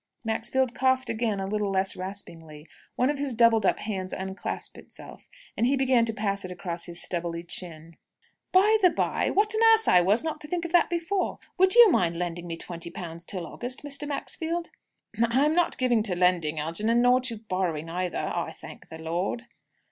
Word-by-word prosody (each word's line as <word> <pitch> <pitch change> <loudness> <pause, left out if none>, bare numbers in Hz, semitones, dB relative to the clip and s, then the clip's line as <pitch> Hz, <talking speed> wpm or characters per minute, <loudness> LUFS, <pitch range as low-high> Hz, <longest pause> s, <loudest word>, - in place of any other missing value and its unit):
Maxfield 240 +3 0
coughed 260 0 +1
again, 220 -3 -1
a 195 - -2
little 205 +1 -1
less 190 0 +1
raspingly. 165 -5 -7 0.3
One 255 +3 +2
of 290 - -5
his 280 -4 -2
doubled 225 -3 +4
up - - +2
hands 190 -3 -4
unclasped 190 +1 -5
itself, - - -13 0.3
and 235 - +1
he 275 - +2
began 260 -3 +3
to 225 - -1
pass 200 -2 -1
it 185 - -6
across 175 -1 -4
his 175 -1 -3
stubbly 170 -1 -2
chin. 165 -2 -6 0.5
"By 420 +4 +5
the 365 - +6
by - - -1
what 420 +2 +2
an 435 - 0
ass 445 - +2
I 180 - +6
was 205 - +3
not 315 -1 -4
to 300 - -7
think 345 +2 -3
of 340 - -5
that 350 -1 +4
before 345 +3 -1 0.2
would 375 +3 +5
you 475 -4 +9
mind 170 - +1
lending 175 0 -4
me 165 -1 -5
twenty 170 0 -6
pounds 170 0 -7
till 185 -3 -4
August, 255 - -5
Mr. 290 0 -3
Maxfield?" 330 +3 -3 0.5
"I 235 +4 +3
I'm 305 - +2
not 350 0 +2
given 245 -3 +2
to 200 -4 0
lending, 175 -3 +1
Algernon; 215 +10 0
nor 250 +1 +4
to 240 -3 -1
borrowing 185 -7 -3
either, 175 +1 -3
I - - -3
thank - - -13
the 160 - -9
Lord." 175 +8 -3
215 Hz, 195 wpm, -26 LUFS, 175-265 Hz, 0.5 s, you